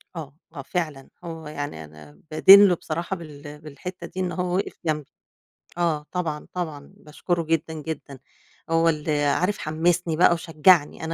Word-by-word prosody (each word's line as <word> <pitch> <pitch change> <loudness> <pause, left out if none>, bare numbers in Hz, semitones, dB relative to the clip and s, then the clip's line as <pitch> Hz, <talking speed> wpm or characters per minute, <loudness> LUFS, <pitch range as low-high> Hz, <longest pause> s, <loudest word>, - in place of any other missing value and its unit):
آه، 150 -4 -7 0.2
آه 140 - -5
فعلًا 155 -4 -4
هو 165 -2 -7
يعني 145 - -5
أنا 75 -1 -16
بادين 195 +6 +9
له 180 - +3
بصراحة 170 +3 -4
بال 150 -3 -10
بالحِتّة 155 +5 -8
دي، 185 - -8
إن 180 -1 -1
هو 180 0 -2
وقِف 195 - -2
جنبي. 150 -3 -2 0.7
آه 160 -4 0
طبعًا، 160 -5 -3
طبعًا 155 -6 -5
باشكره 165 +3 -3
جدًا، 160 0 -1
جدًا، 150 -3 -7 0.5
هو 165 0 +3
ال 155 -1 -2 0.2
عارف، 180 +8 +1
حّمسني 165 +1 0
بقى 175 0 +6
وشجّعني، 165 -1 +3
أنا 160 - -5
160 Hz, 155 wpm, -24 LUFS, 150-175 Hz, 0.7 s, بادين